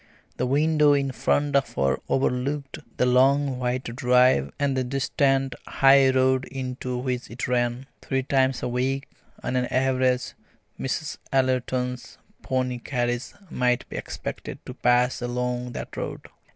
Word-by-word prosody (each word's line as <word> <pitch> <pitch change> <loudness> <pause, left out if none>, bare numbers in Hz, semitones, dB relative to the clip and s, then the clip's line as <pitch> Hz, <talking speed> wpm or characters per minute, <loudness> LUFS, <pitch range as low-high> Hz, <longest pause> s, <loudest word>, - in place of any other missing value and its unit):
The 125 - 0
window 150 +2 +4
in 140 -1 +1
front 145 +2 0
of 140 -1 +1
her 70 0 +1
overlooked 135 +2 -1 0.2
the - - +3
long 135 +1 +3
white 125 +1 -1
drive 125 - +3
and 140 -2 0
the 130 - +1
distant 135 +1 +1
high 135 0 +5
road 130 0 +2
into 130 -1 -4
which 125 0 -3
it 120 +2 -4
ran. 120 +1 0 0.2
Three 135 -1 -1
times 130 -1 +1
a - - 0
week 130 +3 -1 0.4
on - - -2
an 125 0 +1
average 130 -1 +1 0.5
Mrs. 145 +4 -3
Ellerton's 130 -1 -1 0.2
pony 130 -1 -1
carriage 120 -1 -2 0.2
might 125 -1 +1
be - - -8
expected - - -6
to - - -7
pass 125 +1 +2
along 125 0 -2
that - - -7
road. - - -5
130 Hz, 140 wpm, -25 LUFS, 125-135 Hz, 0.5 s, high